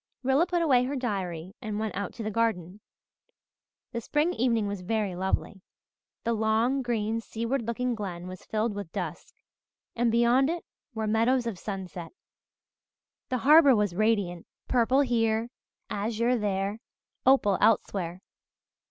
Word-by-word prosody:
Rilla 270 +7 +3
put 345 -1 +1
away 255 -6 +4
her 275 +3 -3
diary 190 -8 -3
and 215 -3 -3
went 220 -1 -2
out 200 0 -3
to 230 - -6
the 215 - -2
garden. 205 -4 -1 1.1
The 235 - -3
spring 300 +8 +1
evening 230 -5 +1
was 200 -2 -4
very 205 -1 -1
lovely. 190 +1 -2 0.6
The 230 - +1
long, 225 +5 +1
green, 230 -2 -1
seaward 230 +2 -3
looking 245 +1 -1
glen 185 -6 -5
was 185 0 -9
filled 220 0 -1
with 200 -5 -6
dusk, - - -6 0.6
and 235 -1 +2
beyond 240 +4 +4
it 340 0 -3 0.3
were 220 0 -2
meadows 230 +4 +2
of 220 -6 -4
sunset. 185 - -6 1.2
The 255 - 0
harbour 295 -2 +8
was 210 -4 +1
radiant, 200 -4 0 0.2
purple 255 +2 +3
here, 230 -2 +1 0.4
azure 230 +4 0
there, 200 -1 -1 0.4
opal 255 -7 +4
elsewhere. 190 -4 +1
225 Hz, 140 wpm, -28 LUFS, 200-245 Hz, 1.2 s, harbour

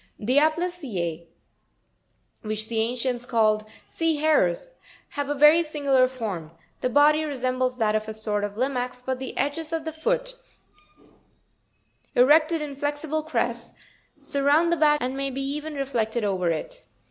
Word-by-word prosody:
38. - - -9
The 255 +5 +4
Aptystm, 280 - -2 1.1
which 215 0 -4
the 225 -1 -1
ancients 245 +1 -1
called 215 -3 +2 0.2
sea 330 -1 0
hares, 295 - +1 0.4
have 285 -1 -4
a 290 - 0
very 300 +4 +7
singular 280 -5 +2
form; 215 -11 -5 0.3
the 255 - 0
body 295 +4 +4
resembles 255 -3 -1
that 220 -3 +1
of 215 0 -1
a 220 - -4
sort 210 -1 -2
of 205 0 -4
Limax; 250 -1 -2
but 260 0 -2
the 260 - -6
edges 295 +4 -2
of 325 -1 -2
the 320 - -4
foot, - - -1 1.8
erected 310 +5 +4
in 285 -2 -6
flexible 290 +2 -2
crests, 315 +1 -3 0.4
surround 290 +4 +2
the 340 - +2
back 300 -1 +4
and 255 0 -2
may 275 0 -2
be 270 +1 -4
even 295 +2 -4
reflected 240 -5 -1
over 190 -4 0
it. - - -4
270 Hz, 150 wpm, -25 LUFS, 230-305 Hz, 1.8 s, very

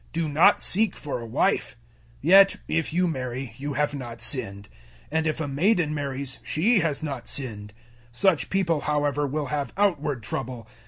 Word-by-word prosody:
Do 165 -1 -1
not 150 +3 +4
seek 210 0 +2
for 145 -4 -5
a 115 - -7
wife. - - 0 0.5
007:028 155 - -1
Yet 195 0 +8
if 165 -1 -1
you 180 +2 +1
marry, 130 -5 -4
you 145 +1 -4
have 145 +1 0
not 120 -4 -7
sinned; 100 -7 0 0.4
and 160 +1 0
if 155 - -1
a 160 - -2
maiden 160 +2 +1
marries, 140 -2 -4
she 210 +8 +2
has 160 -3 -1
not 140 -6 -5
sinned. 105 -6 -3 0.4
Such 165 +6 +1
people, 170 -6 0
however, 145 -1 0
will 145 0 -3
have 140 -4 -2
outward 150 - 0
trouble. 115 +2 -5
145 Hz, 170 wpm, -25 LUFS, 130-165 Hz, 0.5 s, Yet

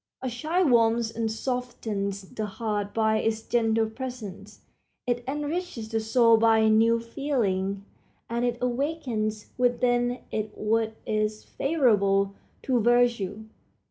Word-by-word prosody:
A 260 - -1
child 315 +5 +1
warms 230 -1 +3
and 225 -1 -1
softens 220 -5 -3
the 215 +3 -5
heart 210 -1 -3
by 220 0 +2
its 220 0 -1
gentle 225 -2 +2
presence; 220 -4 -8 0.4
it 245 0 -1
enriches 295 -4 -3
the 225 0 0
soul 230 +1 +4
by 220 -1 +4
new 225 +2 +4
feeling, 205 -6 -1 0.4
and 235 +1 -2
it 240 -1 0
awakens 245 -5 -2
within 245 0 +2
it 215 -1 -3
what 220 +1 0
is 215 0 -1
favorable 200 -10 +2 0.3
to 255 -2 +2
virtue. 235 -3 +2
225 Hz, 120 wpm, -26 LUFS, 215-245 Hz, 0.4 s, soul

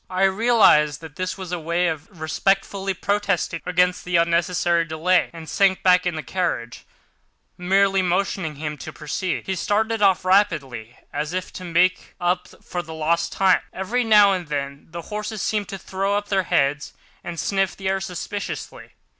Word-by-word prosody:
I 185 +1 0
realised 190 - +4
that 160 -2 -11
this 185 +1 -3
was 185 -2 -7
his 180 - -2
way 170 +2 0
of 160 +2 -5
respectfully 195 +4 0
protesting 200 -4 -1
against 180 0 +2
the 180 -1 -2
unnecessary 170 0 +2
delay, 165 +3 +1
and 165 -1 -10
sank 195 +1 +2
back 180 -1 +4
in 175 - -1
the 155 - -4
carriage, 125 -11 -3 0.7
merely 195 +2 +2
motioning 180 -3 -1
him 150 0 -5
to - - -7
proceed. 165 +4 -3
He 190 - -2
started 220 +4 0
off 190 -2 +3
rapidly, 145 - +1 0.2
as 150 +3 -3
if 185 0 -4
to 185 - -8
make 180 +2 +1
up 180 +1 0 0.2
for 175 - -4
lost 165 0 -1
time. 190 -1 +3
Every 230 +7 -1
now 210 -3 +6
and 180 -3 -3
then 140 -1 -4
the 170 +1 -7
horses 210 0 -5
seemed 210 -2 -1
to 195 - -5
throw 195 +2 -1
up 205 0 -5
their 190 -2 +1
heads 140 +1 +1 0.3
and 170 -1 -6
sniffed 195 -2 0
the 195 - -5
air 190 0 0
suspiciously. 190 +2 -6
180 Hz, 170 wpm, -22 LUFS, 165-195 Hz, 0.7 s, now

